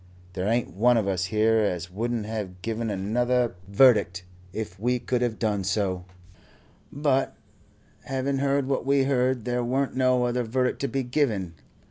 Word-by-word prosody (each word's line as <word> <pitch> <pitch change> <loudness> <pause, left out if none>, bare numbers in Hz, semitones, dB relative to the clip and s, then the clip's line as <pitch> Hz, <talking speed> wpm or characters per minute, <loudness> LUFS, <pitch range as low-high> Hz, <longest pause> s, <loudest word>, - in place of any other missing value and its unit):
There 95 +1 -2
ain't 115 +1 0
one 120 +5 +4
of 105 -3 0
us 90 -2 0
here 110 +2 +2
as 90 -4 -1
wouldn't 115 +2 -2
have 100 -4 -5
given 115 0 -2
another 120 +5 0
verdict 100 -5 +4 0.3
if 100 -2 -6
we 125 +3 +1
could 125 0 -1
have 120 -3 -1
done 105 -3 0
so, 95 -2 -1 0.9
but 140 -2 0 0.7
having 135 +1 -1
heard 140 -1 +1
what 135 - 0
we 140 0 +3
heard 130 -3 +1
there 125 0 -1
weren't 130 +3 -1
no 130 -1 +3
other 120 +1 0
verdict 125 +2 -1
to 140 - 0
be 135 -1 -2
given. 120 - -1
120 Hz, 160 wpm, -26 LUFS, 105-130 Hz, 0.9 s, one